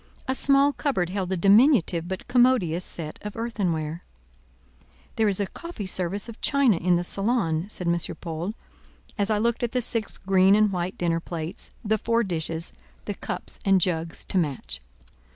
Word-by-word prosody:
A 260 Hz, -, +1 dB
small 275 Hz, +1 st, +4 dB
cupboard 215 Hz, -, -1 dB
held 190 Hz, -2 st, -2 dB
a 190 Hz, -, 0 dB
diminutive 195 Hz, -, +4 dB
but 190 Hz, 0 st, -5 dB
commodious 245 Hz, -9 st, +3 dB
set 155 Hz, -4 st, -4 dB
of 210 Hz, -1 st, -7 dB
earthenware. 175 Hz, -9 st, -2 dB, 1.1 s
"There 220 Hz, -, +2 dB
is 200 Hz, -1 st, +1 dB
a 200 Hz, -, +1 dB
coffee 335 Hz, -, -8 dB
service 185 Hz, +2 st, 0 dB
of 230 Hz, -1 st, -10 dB
china 275 Hz, -, +3 dB
in 180 Hz, +1 st, +2 dB
the 175 Hz, -, 0 dB
salon," 195 Hz, -4 st, 0 dB
said 180 Hz, -4 st, -3 dB
M. 170 Hz, -, +3 dB, 0.2 s
Paul, 170 Hz, +5 st, -4 dB, 0.6 s
as 200 Hz, +1 st, +1 dB
I 215 Hz, -, +2 dB
looked 230 Hz, +2 st, 0 dB
at 240 Hz, -2 st, -2 dB
the 250 Hz, -, +1 dB
six 225 Hz, -2 st, +1 dB
green 190 Hz, +1 st, +4 dB
and 210 Hz, -1 st, +3 dB
white 180 Hz, 0 st, -3 dB
dinner 170 Hz, -1 st, 0 dB
plates; 165 Hz, 0 st, -6 dB, 0.2 s
the 215 Hz, +1 st, +1 dB
four 230 Hz, +2 st, +1 dB
dishes, 165 Hz, -3 st, -3 dB, 0.3 s
the 205 Hz, -, -3 dB
cups -, -, -6 dB
and 195 Hz, -1 st, +4 dB
jugs 165 Hz, -2 st, -2 dB
to 190 Hz, -, 0 dB
match. 120 Hz, -, -3 dB
190 Hz, 170 wpm, -25 LUFS, 170-225 Hz, 1.1 s, small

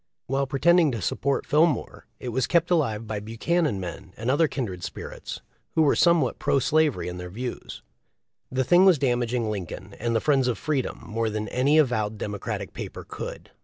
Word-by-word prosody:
While 135 Hz, +1 st, 0 dB
pretending 165 Hz, +4 st, +4 dB
to 115 Hz, -, -2 dB
support 135 Hz, +9 st, -1 dB
Fillmore 150 Hz, -3 st, +1 dB
it 125 Hz, -, -5 dB
was 125 Hz, +1 st, 0 dB
kept 170 Hz, 0 st, +2 dB
alive 115 Hz, -10 st, +1 dB
by 105 Hz, -1 st, -3 dB
Buchanan 115 Hz, -, 0 dB
men 90 Hz, +1 st, -7 dB
and 115 Hz, +4 st, 0 dB
other 155 Hz, +4 st, +4 dB
kindred 100 Hz, -12 st, -4 dB
spirits, -, -, -7 dB, 0.3 s
who 160 Hz, -, +5 dB
were 145 Hz, -, +4 dB
somewhat 170 Hz, -7 st, +3 dB
pro -, -, +2 dB
slavery 155 Hz, -1 st, +2 dB
in 90 Hz, 0 st, -5 dB
their 90 Hz, 0 st, -6 dB
views. 120 Hz, +6 st, -6 dB, 0.7 s
The 130 Hz, +1 st, +1 dB
thing 175 Hz, +8 st, +5 dB
was 190 Hz, -4 st, +6 dB
damaging 120 Hz, -4 st, 0 dB
Lincoln 95 Hz, 0 st, -6 dB
and 115 Hz, -1 st, -1 dB
the -, -, +4 dB
friends 135 Hz, 0 st, +2 dB
of 125 Hz, -, 0 dB
freedom 145 Hz, -5 st, -2 dB
more 115 Hz, 0 st, -1 dB
than 110 Hz, 0 st, -3 dB
an 130 Hz, +2 st, 0 dB
avowed 110 Hz, -7 st, +2 dB
Democratic 105 Hz, -1 st, -4 dB
paper -, -, -7 dB
could. -, -, -7 dB
125 Hz, 180 wpm, -25 LUFS, 110-150 Hz, 0.7 s, was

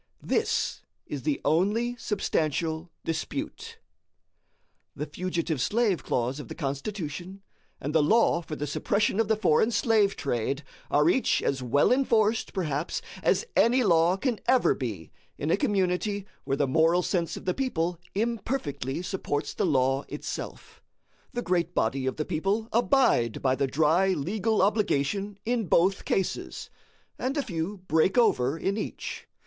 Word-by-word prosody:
This -, -, 0 dB, 0.2 s
is 145 Hz, -, -5 dB
the 145 Hz, +2 st, -1 dB
only 210 Hz, +9 st, +2 dB
substantial 165 Hz, -, -1 dB, 0.2 s
dispute. 305 Hz, -, -4 dB, 1.2 s
The 150 Hz, +1 st, -3 dB
fugitive 165 Hz, -2 st, -2 dB
slave 210 Hz, -, +1 dB
clause 125 Hz, +3 st, -1 dB
of 140 Hz, -, -8 dB
the -, -, -7 dB
Constitution, 175 Hz, +5 st, -5 dB, 0.4 s
and 145 Hz, +3 st, -4 dB
the 160 Hz, -, +5 dB
law 175 Hz, +1 st, +3 dB
for 160 Hz, -2 st, -6 dB
the 145 Hz, -, -3 dB
suppression 200 Hz, +8 st, 0 dB
of 225 Hz, -, +2 dB
the 220 Hz, -, +3 dB
foreign 215 Hz, 0 st, +3 dB
slave 220 Hz, -4 st, +2 dB
trade, 135 Hz, +2 st, -2 dB, 0.3 s
are 150 Hz, +1 st, +3 dB
each 255 Hz, +9 st, +2 dB
as 135 Hz, -1 st, 0 dB
well 125 Hz, +3 st, +3 dB
enforced, 230 Hz, -4 st, +2 dB
perhaps, 160 Hz, -4 st, -2 dB, 0.2 s
as -, -, +2 dB
any 250 Hz, +2 st, +4 dB
law 170 Hz, -2 st, +4 dB
can 240 Hz, 0 st, -1 dB
ever 255 Hz, -1 st, +4 dB
be 105 Hz, -, -5 dB, 0.3 s
in 150 Hz, +3 st, -1 dB
a -, -, +5 dB
community 200 Hz, -4 st, 0 dB, 0.2 s
where 135 Hz, -, 0 dB
the 145 Hz, -, +2 dB
moral 165 Hz, +5 st, +3 dB
sense 170 Hz, -3 st, -1 dB
of -, -, -10 dB
the 180 Hz, -, +1 dB
people 175 Hz, -11 st, -1 dB, 0.2 s
imperfectly 200 Hz, -, -2 dB
supports 180 Hz, -6 st, -3 dB
the -, -, 0 dB
law 135 Hz, 0 st, +2 dB
itself. -, -, -7 dB, 0.5 s
The 240 Hz, -, -2 dB
great 175 Hz, -1 st, 0 dB
body 130 Hz, +4 st, 0 dB
of 130 Hz, -, -1 dB
the 155 Hz, -, -2 dB
people 195 Hz, +7 st, -1 dB
abide 235 Hz, -, +3 dB
by 130 Hz, -1 st, +3 dB
the 135 Hz, +1 st, 0 dB
dry 160 Hz, +7 st, +3 dB
legal 205 Hz, +6 st, 0 dB
obligation 200 Hz, -1 st, 0 dB
in 230 Hz, -3 st, 0 dB
both 185 Hz, +5 st, +2 dB
cases, 190 Hz, -, -2 dB, 0.5 s
and 265 Hz, +4 st, -1 dB
a 285 Hz, -, +1 dB
few 180 Hz, -1 st, -3 dB
break 160 Hz, +7 st, +2 dB
over 145 Hz, -, +3 dB
in 195 Hz, +5 st, -1 dB
each. -, -, -6 dB
180 Hz, 150 wpm, -27 LUFS, 150-215 Hz, 1.2 s, the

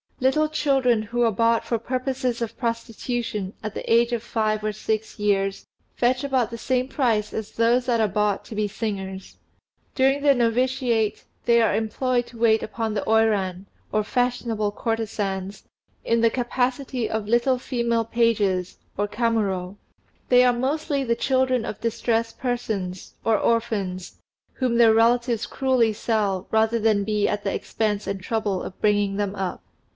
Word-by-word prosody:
Little 305 Hz, +4 st, +2 dB
children 270 Hz, -7 st, +2 dB
who 240 Hz, +3 st, -1 dB
are 230 Hz, -, +3 dB
bought 230 Hz, +2 st, +2 dB
for 235 Hz, -, 0 dB
purposes 255 Hz, 0 st, -2 dB
of 225 Hz, -, -6 dB
prostitution 230 Hz, -3 st, -3 dB
at 215 Hz, 0 st, -4 dB
the -, -, -5 dB
age 235 Hz, +1 st, +4 dB
of 235 Hz, -, -1 dB
five 215 Hz, -2 st, -1 dB
or 215 Hz, -, 0 dB
six 215 Hz, +1 st, -3 dB
years 195 Hz, -1 st, 0 dB, 0.3 s
fetch 250 Hz, +2 st, +1 dB
about 260 Hz, -5 st, +1 dB
the 230 Hz, -, -5 dB
same 255 Hz, +1 st, 0 dB
price 230 Hz, -7 st, 0 dB
as 220 Hz, -1 st, -4 dB
those 235 Hz, +2 st, +2 dB
that 235 Hz, -2 st, +2 dB
are 220 Hz, -, +3 dB
bought 210 Hz, 0 st, 0 dB
to 220 Hz, -, -9 dB
be 210 Hz, 0 st, 0 dB
singers. 195 Hz, -3 st, -5 dB, 0.6 s
During 270 Hz, +1 st, +3 dB
their 285 Hz, -1 st, +5 dB
novitiate 240 Hz, -2 st, +1 dB, 0.2 s
they 235 Hz, -1 st, +5 dB
are 225 Hz, -3 st, +3 dB
employed 240 Hz, +3 st, 0 dB
to 235 Hz, -, -13 dB
wait 225 Hz, -1 st, +3 dB
upon 220 Hz, 0 st, -3 dB
the 205 Hz, -, -1 dB
Oiran, 205 Hz, -4 st, +2 dB, 0.3 s
or 215 Hz, -, +1 dB
fashionable 235 Hz, -3 st, -1 dB
courtesans, 205 Hz, -3 st, -3 dB, 0.4 s
in 230 Hz, 0 st, +1 dB
the 230 Hz, -, +5 dB
capacity 250 Hz, 0 st, -1 dB
of 220 Hz, -2 st, -2 dB
little 240 Hz, +3 st, +2 dB
female 235 Hz, -3 st, 0 dB
pages 210 Hz, -6 st, +1 dB, 0.2 s
(Kamuro). 205 Hz, -3 st, -1 dB, 0.5 s
They 250 Hz, 0 st, +6 dB
are 250 Hz, -1 st, +4 dB
mostly 275 Hz, +3 st, -1 dB
the 235 Hz, -2 st, +1 dB
children 260 Hz, -1 st, +1 dB
of -, -, -6 dB
distressed 230 Hz, 0 st, -1 dB
persons, 210 Hz, -7 st, -3 dB
or 225 Hz, -1 st, +3 dB
orphans, 200 Hz, -6 st, -1 dB, 0.3 s
whom 250 Hz, -3 st, 0 dB
their 230 Hz, -2 st, +6 dB
relatives 235 Hz, +1 st, +2 dB
cruelly 255 Hz, -4 st, +1 dB
sell 205 Hz, -4 st, -1 dB
rather 220 Hz, +1 st, +2 dB
than 215 Hz, -2 st, +2 dB
be 210 Hz, 0 st, +1 dB
at 205 Hz, 0 st, -2 dB
the 195 Hz, -, -1 dB
expense 210 Hz, -2 st, -2 dB
and 195 Hz, -1 st, -3 dB
trouble 205 Hz, -2 st, -1 dB
of 185 Hz, -, -8 dB
bringing 205 Hz, -1 st, +2 dB
them 205 Hz, -1 st, -2 dB
up. 190 Hz, -2 st, -4 dB
225 Hz, 160 wpm, -24 LUFS, 210-245 Hz, 0.6 s, They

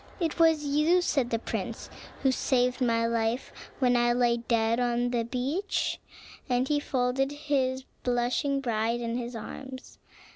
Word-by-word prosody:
"It 335 Hz, -2 st, -1 dB
was 320 Hz, -2 st, +4 dB
you," 300 Hz, +5 st, +3 dB
said 270 Hz, -8 st, +1 dB
the 230 Hz, -, +1 dB
prince, 225 Hz, -, -4 dB, 0.4 s
"who 265 Hz, -, +4 dB
saved 250 Hz, 0 st, +1 dB
my 230 Hz, -2 st, +2 dB
life 230 Hz, +2 st, -1 dB, 0.2 s
when 250 Hz, -2 st, +3 dB
I 240 Hz, 0 st, +3 dB
lay 240 Hz, -1 st, +2 dB
dead 230 Hz, 0 st, +1 dB
on 245 Hz, 0 st, +1 dB
the 235 Hz, -2 st, +1 dB
beach," 270 Hz, -, -2 dB, 0.5 s
and 250 Hz, +1 st, +1 dB
he 295 Hz, 0 st, +2 dB
folded 265 Hz, 0 st, 0 dB
his 270 Hz, -3 st, -1 dB, 0.2 s
blushing 255 Hz, +4 st, 0 dB
bride 230 Hz, -1 st, 0 dB
in 235 Hz, -1 st, -3 dB
his 240 Hz, 0 st, -4 dB
arms. 260 Hz, +4 st, -8 dB
250 Hz, 150 wpm, -28 LUFS, 235-275 Hz, 0.5 s, was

